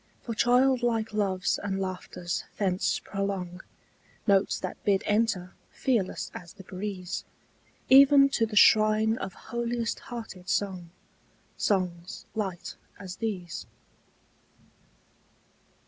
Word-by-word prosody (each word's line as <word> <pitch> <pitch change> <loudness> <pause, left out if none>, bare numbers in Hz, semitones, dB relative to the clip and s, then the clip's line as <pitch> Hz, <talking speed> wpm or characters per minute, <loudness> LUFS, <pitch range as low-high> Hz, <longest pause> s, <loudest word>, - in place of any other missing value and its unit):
For 235 - -4
childlike 240 -2 +2
loves 195 -3 0
and 195 -1 -2
laughters 185 -2 -4
thence 190 -2 +1
prolong 195 -2 -4 0.6
Notes 200 -2 +3
that - - -6
bid 195 -2 +2
enter, 205 -4 0 0.2
fearless 230 -9 -1
as 175 -2 -9
the 195 - -13
breeze, 185 -1 -5 0.6
Even 275 +1 +8
to 230 -4 +1
the 215 - -7
shrine 215 +1 +5
of 190 - -5
holiest 235 +1 -3
hearted 220 -6 -7
song, 185 -3 -1 0.7
Songs 180 -3 -1
light 195 -5 -4 0.2
as 185 -2 -8
these. 195 -7 -4
200 Hz, 100 wpm, -28 LUFS, 185-225 Hz, 0.7 s, Even